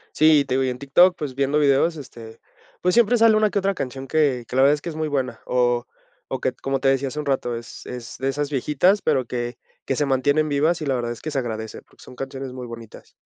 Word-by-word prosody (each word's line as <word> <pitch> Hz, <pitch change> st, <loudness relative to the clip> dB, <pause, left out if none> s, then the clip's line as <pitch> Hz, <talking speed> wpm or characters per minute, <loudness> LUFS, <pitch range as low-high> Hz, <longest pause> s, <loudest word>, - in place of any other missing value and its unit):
Sí, 155 Hz, -1 st, +6 dB
y -, -, 0 dB
te 135 Hz, -, -2 dB
digo, 135 Hz, 0 st, +2 dB
y 130 Hz, -, 0 dB
en 125 Hz, -, -5 dB
TikTok, 175 Hz, +7 st, +4 dB
pues 140 Hz, -4 st, -5 dB
viendo 140 Hz, +2 st, +1 dB
videos, 145 Hz, +3 st, +3 dB
este, 115 Hz, -5 st, -11 dB, 0.4 s
pues 180 Hz, 0 st, +1 dB
siempre 235 Hz, 0 st, +4 dB
sale 225 Hz, -1 st, +5 dB
una 215 Hz, -1 st, +3 dB
que 200 Hz, -, 0 dB
otra 195 Hz, 0 st, 0 dB
canción 135 Hz, -1 st, -5 dB
que 140 Hz, -5 st, +1 dB
que 125 Hz, -, -5 dB
la 130 Hz, -, +5 dB
verdad 140 Hz, +2 st, +6 dB
es 145 Hz, -, -6 dB
que -, -, -5 dB
es 155 Hz, -, -6 dB
muy 155 Hz, -1 st, -2 dB
buena, 135 Hz, -3 st, -2 dB
o 120 Hz, -1 st, +1 dB, 0.4 s
o 130 Hz, -, -3 dB
que, 130 Hz, -, 0 dB
como 135 Hz, +1 st, -3 dB
te 135 Hz, -, +2 dB
decía 135 Hz, 0 st, +2 dB
hace 150 Hz, -, -7 dB
un 150 Hz, -, -7 dB
rato, 125 Hz, -3 st, -1 dB
es 115 Hz, +1 st, -10 dB
es 125 Hz, -2 st, -7 dB
de 135 Hz, +1 st, -1 dB
esas 145 Hz, +1 st, -2 dB
viejitas, 150 Hz, +8 st, +2 dB
pero 130 Hz, -2 st, +1 dB
que 120 Hz, 0 st, -4 dB, 0.3 s
que 135 Hz, -, -1 dB
se 145 Hz, -, +1 dB
mantienen 145 Hz, +3 st, +2 dB
vivas, 155 Hz, +4 st, +1 dB
y 150 Hz, -, -4 dB
la 135 Hz, -, +1 dB
verdad 120 Hz, -1 st, -2 dB
es 120 Hz, -, -10 dB
que 155 Hz, -, -4 dB
se 145 Hz, -, -2 dB
agradece, 110 Hz, -3 st, -5 dB
porque -, -, -22 dB
son -, -, -12 dB
canciones 135 Hz, 0 st, -6 dB
muy 125 Hz, -1 st, -7 dB
bonitas. 115 Hz, -2 st, -11 dB
135 Hz, 265 wpm, -23 LUFS, 125-150 Hz, 0.4 s, Sí